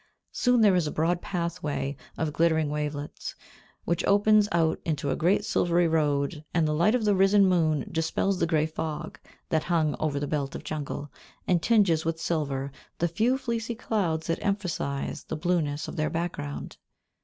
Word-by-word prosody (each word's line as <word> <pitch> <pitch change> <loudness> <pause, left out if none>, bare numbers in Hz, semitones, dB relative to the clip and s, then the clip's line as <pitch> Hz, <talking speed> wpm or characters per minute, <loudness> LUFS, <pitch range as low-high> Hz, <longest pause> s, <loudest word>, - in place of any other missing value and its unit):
Soon 245 -2 +2
there 205 -3 +6
is 175 -4 +2
a - - -2
broad 170 +3 0
pathway 170 -5 -3 0.2
of 155 -2 -1
glittering 160 -1 +2
wavelets, 150 -1 -4 0.5
which 170 0 0
opens 210 +1 +4
out 165 -1 +1
into 145 -3 -1
a - - +1
great 180 +5 +2
silvery 175 0 +2
road, 150 -1 0
and 165 -2 +3
the 150 - 0
light 170 +9 +3
of 235 -3 0
the 205 - +4
risen 195 +1 +5
moon 160 -6 +2
dispels 165 +4 0
the 170 - +2
grey 155 -2 +2
fog 155 -1 -5 0.3
that 160 -1 +1
hung 160 -4 +1
over 145 -2 0
the 145 - -2
belt 140 -2 -2
of - - -6
jungle, 145 -1 -5 0.4
and 175 -2 +3
tinges 195 -8 +3
with 165 0 -2
silver 140 -5 -2 0.3
the 170 - +1
few 225 +10 +1
fleecy 235 -2 -3
clouds 190 -9 -1
that 165 - -2
emphasise 180 -9 -2
the - - -5
blueness 155 -3 -1
of - - -7
their 155 0 +1
background. 115 - -4
165 Hz, 175 wpm, -27 LUFS, 150-185 Hz, 0.5 s, there